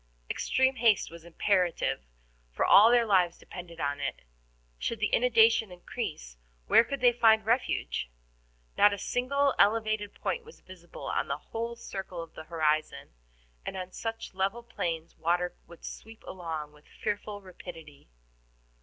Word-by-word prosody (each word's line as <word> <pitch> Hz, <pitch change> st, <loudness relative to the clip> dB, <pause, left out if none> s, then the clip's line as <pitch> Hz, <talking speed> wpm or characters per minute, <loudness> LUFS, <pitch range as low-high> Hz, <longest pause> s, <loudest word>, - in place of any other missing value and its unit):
Extreme 260 Hz, 0 st, +1 dB
haste 225 Hz, -7 st, +3 dB
was 170 Hz, -1 st, -11 dB
imperative, 170 Hz, -, 0 dB, 0.4 s
for -, -, 0 dB
all 215 Hz, +3 st, +8 dB
their 240 Hz, -1 st, +5 dB
lives 185 Hz, -5 st, +3 dB
depended 170 Hz, -2 st, -10 dB
on 145 Hz, -1 st, -1 dB
it. -, -, -4 dB, 0.6 s
Should 230 Hz, -, -2 dB
the 215 Hz, -, 0 dB
inundation 225 Hz, -3 st, +4 dB
increase, -, -, -6 dB, 0.3 s
where 230 Hz, -, +6 dB
could 275 Hz, +2 st, -5 dB
they 245 Hz, -1 st, +7 dB
find 225 Hz, -2 st, +4 dB
refuge? 225 Hz, -, 0 dB, 0.7 s
Not 205 Hz, -, +7 dB
a -, -, -3 dB
single 275 Hz, +6 st, +1 dB
elevated 215 Hz, -1 st, +2 dB
point 475 Hz, -, -2 dB
was 465 Hz, +1 st, -15 dB
visible 175 Hz, -2 st, -11 dB
on -, -, -1 dB
the 140 Hz, -, -2 dB
whole 230 Hz, +8 st, -5 dB
circle 190 Hz, -6 st, -6 dB
of 165 Hz, -, -14 dB
the 160 Hz, -, -9 dB
horizon, 155 Hz, -2 st, 0 dB, 0.5 s
and -, -, -5 dB
on 185 Hz, 0 st, -5 dB
such 225 Hz, 0 st, -5 dB
level 195 Hz, +5 st, -1 dB
plains 170 Hz, -8 st, -4 dB
water 175 Hz, +2 st, 0 dB
would 170 Hz, -, -13 dB
sweep 225 Hz, 0 st, -10 dB
along 160 Hz, -5 st, -5 dB
with 150 Hz, 0 st, -21 dB
fearful 205 Hz, 0 st, -4 dB
rapidity. 165 Hz, -, -11 dB
195 Hz, 145 wpm, -29 LUFS, 165-225 Hz, 0.7 s, all